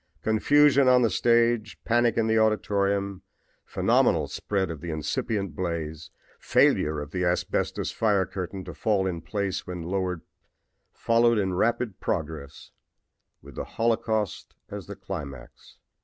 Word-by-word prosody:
Confusion 140 +5 +4
on 125 -1 +5
the 115 - +2
stage, 115 -2 +2
panic 120 0 +2
in 115 - +2
the 110 0 +2
auditorium, 100 -3 0 0.4
phenomenal - - +2
spread 95 -4 -2
of 80 - -8
the 85 - -6
incipient 95 - -2
blaze, 80 -3 -4 0.3
failure 75 0 +2
of 75 0 -7
the 90 0 -2
asbestos 90 0 -1
fire 100 -4 +2
curtain 95 +1 -6
to - - -7
fall 100 -3 0
in 85 -3 -3
place 100 0 -3
when 90 -2 -5
lowered 90 -1 -2 0.7
followed 115 0 +2
in 95 -3 0
rapid 115 +2 0
progress, 80 -4 -4 0.7
with 70 0 -12
the - - -4
holocaust 110 -3 -1
as - - -7
the - - -7
climax." 70 -5 -9
100 Hz, 135 wpm, -26 LUFS, 85-115 Hz, 0.7 s, on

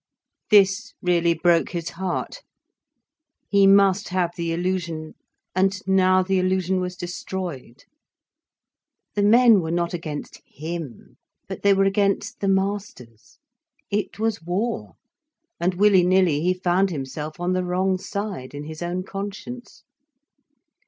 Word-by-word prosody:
This 205 +3 +4
really 170 -1 +2
broke 170 0 +2
his 170 -1 -3
heart. 190 - -4 1.1
He 200 -1 +5
must 195 0 +4
have 180 -2 0
the 170 -1 -3
illusion 170 -2 -3 0.4
and 190 +1 +1
now 185 -1 +4
the 190 0 +1
illusion 185 0 +1
was 180 0 -4
destroyed. 175 -7 -6 1.3
The 205 - 0
men 225 0 +6
were 160 - -4
not 170 +1 -1
against 155 -4 -6
him, 160 -5 -8 0.3
but - - -7
they 200 -1 +4
were 195 - +3
against 195 0 0
the 200 - -1
masters. 190 - -3 0.5
It 205 0 -2
was 220 -2 -1
war, 190 +8 -3 0.7
and 180 +1 0
willy 195 -1 +5
nilly 180 -5 +3
he 180 +2 +1
found 185 +1 +1
himself 150 +1 -6
on 175 +1 0
the 185 0 0
wrong 185 +1 0
side, 195 -9 -5
in 145 - -6
his 155 +1 -9
own 175 +1 -2
conscience. 205 +6 -8
185 Hz, 130 wpm, -23 LUFS, 170-195 Hz, 1.3 s, men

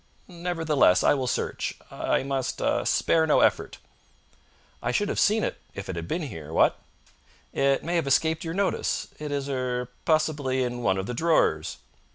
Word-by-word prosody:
"Nevertheless, 165 - +2
I - - +5
will 130 -3 -1
search. - - -2 0.2
I - - 0
must 135 -2 -2
ah - - +1
spare 160 -1 +2
no 150 - +4
effort." - - +1 1.0
"I - - -1
should 205 -1 0
have - - -1
seen 215 +2 +3
it - - -3
if 100 - -7
it 95 - -3
had 85 0 -5
been 170 - -2
here 80 - -7
what?" - - +3 0.7
"It 135 0 +2
may 170 +2 0
have 160 -4 -1
escaped 160 +4 +2
your 165 0 -4
notice. 200 0 -1
It 150 -1 -5
is 140 -1 -2
er 125 -2 -2
possibly 150 -5 +1
in 120 0 -3
one 95 -5 +1
of 95 - -2
the 125 - -4
drawers." 120 - +1
140 Hz, 180 wpm, -26 LUFS, 125-165 Hz, 1.0 s, I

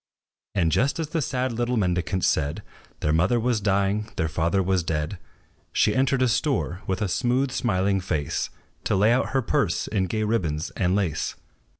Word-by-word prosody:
And 85 -5 +2
just 135 - +2
as 160 -2 -2
the 165 0 -1
sad 130 -2 -1
little 120 +1 -1
mendicants 90 -1 0
said, 75 -1 0 0.4
Their 75 - +1
mother 90 +9 +3
was 120 -2 0
dying, 100 +1 +1
their 80 - 0
father 85 +4 +1
was 95 0 +1
dead, 80 +2 -2 0.5
She 105 - +3
entered 130 0 +2
a - - +4
store, 125 - 0
with 95 +2 -1
a - - 0
smooth, 130 +6 +1
smiling 100 -6 +1
face, 75 -6 -2 0.4
To - - +1
lay 105 +4 +4
out 130 - +1
her 135 -1 0
purse - - 0
in 95 -3 0
gay 110 +3 -1
ribbons 85 -9 -1
and 90 0 0
lace. 90 -6 -1
100 Hz, 180 wpm, -25 LUFS, 90-120 Hz, 0.5 s, a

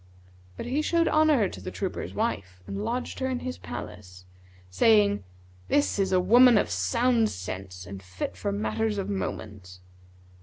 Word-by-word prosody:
But - - -5
he 265 +5 0
showed 335 +1 +2
honour 305 -10 +4
to - - -9
the - - -5
trooper's 190 0 -4
wife 95 - -3
and 100 +2 -5
lodged 250 - -3
her 260 0 -1
in 255 -1 -2
his 255 0 -5
palace, 90 0 -9 0.5
saying, 100 +1 +4 0.4
'This 285 -7 +1
is 195 -1 +1
a 185 - +4
woman 240 +5 +6
of 200 - +1
sound 220 - +2
sense 95 - -7
and 95 +1 -8
fit 95 -1 -5
for 95 +2 -3
matters 110 - -1
of 200 +1 -2
moment.' 100 - -5
115 Hz, 160 wpm, -27 LUFS, -, 0.5 s, woman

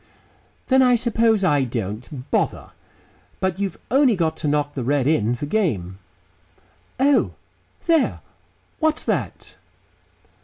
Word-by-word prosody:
"Then 265 0 +4
I 250 -1 +5
suppose 230 -3 +2
I 145 -6 +3
don't. 120 +3 -5
Bother." - - -1 0.7
"But 190 0 -1
you've 200 -1 -2
only 265 -3 +4
got 160 -3 0
to 155 - -3
knock 145 0 0
the 130 - -4
red 140 +1 +1
in 125 -6 +2
for 135 - -5
game." 110 - -1 1.0
"Oh!... 280 +2 +3 0.5
There, 330 -4 +2 0.6
what's 315 -1 +1
that?" - - -3
165 Hz, 120 wpm, -22 LUFS, -, 1.0 s, I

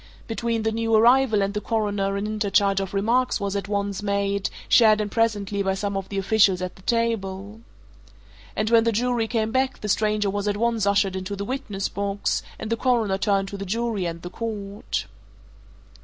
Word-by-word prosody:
Between 230 0 -2
the 220 - +1
new 225 0 +1
arrival 235 -1 +5
and 200 +1 -2
the 210 - -2
Coroner 205 -3 -1
an 200 - -2
interchange 200 -2 +1
of 195 -1 -4
remarks 235 +6 +1
was 200 0 -2
at 200 -1 -3
once 200 -1 -2
made, 200 -1 0 0.2
shared 215 -3 +6
in 210 -1 -1
presently 205 -2 0
by 190 -1 0
some 200 0 -3
of 195 -1 -4
the 200 - -4
officials 195 -1 +3
at 185 0 -5
the - - -17
table. 210 -2 -2 0.9
And 215 +1 -1
when 230 -1 +6
the 230 - +2
jury 235 +1 0
came 220 -1 -1
back 260 +1 0
the 210 - -4
stranger 210 0 +1
was 205 +1 -2
at 205 0 0
once 230 -2 +1
ushered 200 -1 +2
into 190 +2 -4
the 200 0 -4
witness 215 -6 -3
box, 200 0 -2 0.2
and 220 - -6
the 230 - +1
Coroner 225 -6 +1
turned 195 -2 +1
to 200 - -6
the 200 - -5
jury 215 -1 -1
and 170 0 -6
the 175 - -7
court. 205 - -4
205 Hz, 195 wpm, -24 LUFS, 195-225 Hz, 0.9 s, shared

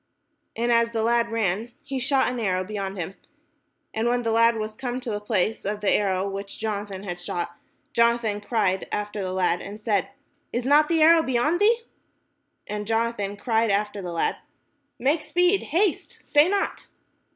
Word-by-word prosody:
And 235 +1 0
as 235 0 +3
the 225 -1 0
lad 235 0 +2
ran, 225 +1 -1
he 270 -1 -4
shot 265 +2 +2
an 250 -1 -2
arrow 185 -4 0
beyond 195 -1 -4
him. 180 +1 -4 0.8
And 220 +2 0
when 245 0 +1
the 230 - 0
lad 230 +1 +4
was 215 0 -4
come 245 +2 -4
to 250 -3 -5
the 205 - -2
place 210 0 0
of 205 +1 -2
the 205 - +2
arrow 195 -1 +1
which 195 0 -6
Jona 210 -2 -3
than 195 -1 -8
had 175 -3 -5
shot, 175 -1 -4 0.4
Jonathan 235 -3 +2
cried 205 -4 0
after 210 0 -3
the 185 -1 -3
lad, 180 -2 +1
and 205 +2 -8
said," 210 -3 0 0.4
Is 240 +1 -2
not 295 +3 +5
the 325 -1 +3
arrow 330 +1 +7
beyond 295 +5 +1
thee?" 460 +3 +4 0.8
And 210 0 -5
Jonathan 225 -3 -1
cried 225 +1 +1
after 205 0 0
the 180 -2 -5
lad, 170 - 0 0.6
"Make 290 +6 +1
speed, 355 +5 +2
haste, 360 +4 0
stay 295 +3 +3
not." 400 0 -1
225 Hz, 180 wpm, -25 LUFS, 200-245 Hz, 0.8 s, arrow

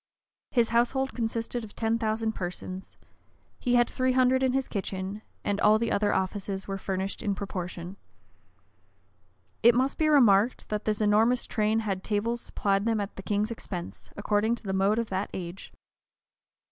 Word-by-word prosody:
His 235 -3 +2
household 245 +3 +1
consisted 230 0 -2
of 210 - -11
ten 225 0 0
thousand 220 0 0
persons: 185 -1 -6 0.6
he 245 0 +1
had 240 0 +5
three 255 -1 0
hundred 260 0 +4
in 260 -1 +2
his 270 0 0
kitchen; 195 0 -4 0.2
and 205 0 -1
all 210 +1 +6
the 230 +1 -1
other 205 0 +2
offices 190 0 -2
were 195 0 -3
furnished 190 +1 -3
in 205 -3 -1
proportion.[*] 180 -1 -5 1.6
It 235 +1 +7
must 260 +2 +1
be 310 - +3
remarked, 235 -6 +4
that 210 0 -2
this 215 0 0
enormous 220 +4 +3
train 215 0 +1
had 195 -3 -3
tables 230 +3 -1
supplied 195 0 0
them 225 -1 +1
at 200 0 -4
the - - -7
king's 205 +3 -1
expense, 180 -6 -7
according 210 +2 +1
to 240 - -12
the 195 -2 -3
mode 195 +3 +2
of 230 -3 -2
that 190 +2 -1
age. 175 +1 -7
215 Hz, 165 wpm, -28 LUFS, 195-235 Hz, 1.6 s, It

